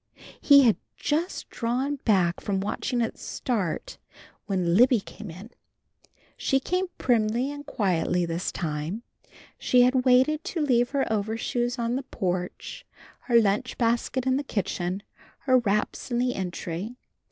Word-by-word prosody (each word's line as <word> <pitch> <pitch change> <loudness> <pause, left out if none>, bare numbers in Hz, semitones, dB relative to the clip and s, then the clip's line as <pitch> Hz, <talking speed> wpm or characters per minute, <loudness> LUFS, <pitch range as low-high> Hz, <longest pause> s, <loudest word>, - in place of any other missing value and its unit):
He 280 -1 +7
had 230 -4 +4 0.2
just 320 +5 -1
drawn 255 +5 -1
back 185 -9 +2
from 195 -2 -1
watching 225 +4 -2
it 225 - -2
start 200 -11 -3 0.5
when 185 -4 0
Libby 245 +2 +6
came 210 +1 -10
in. 190 +8 -10 0.8
She 270 - +1
came 365 +7 -1
primly 235 +2 +1
and 290 0 -9
quietly 180 - 0
this 170 +2 -2
time. 160 +6 -4 0.6
She 250 -1 +4
had 255 +1 +3
waited 260 +5 +4
to 345 - -4
leave 245 -3 +3
her 280 -1 0
overshoes 225 +4 -1
on 235 +1 -1
the - - -2
porch, 185 - -4 0.4
her 235 -2 +5
lunch 210 +3 0
basket 240 +2 0
in 260 0 +2
the 285 - -2
kitchen, 190 -5 -2 0.4
her 255 -2 +4
wraps 210 +2 -1
in 240 - -1
the 250 +1 +1
entry. 185 +3 -4
235 Hz, 140 wpm, -26 LUFS, 195-255 Hz, 0.8 s, He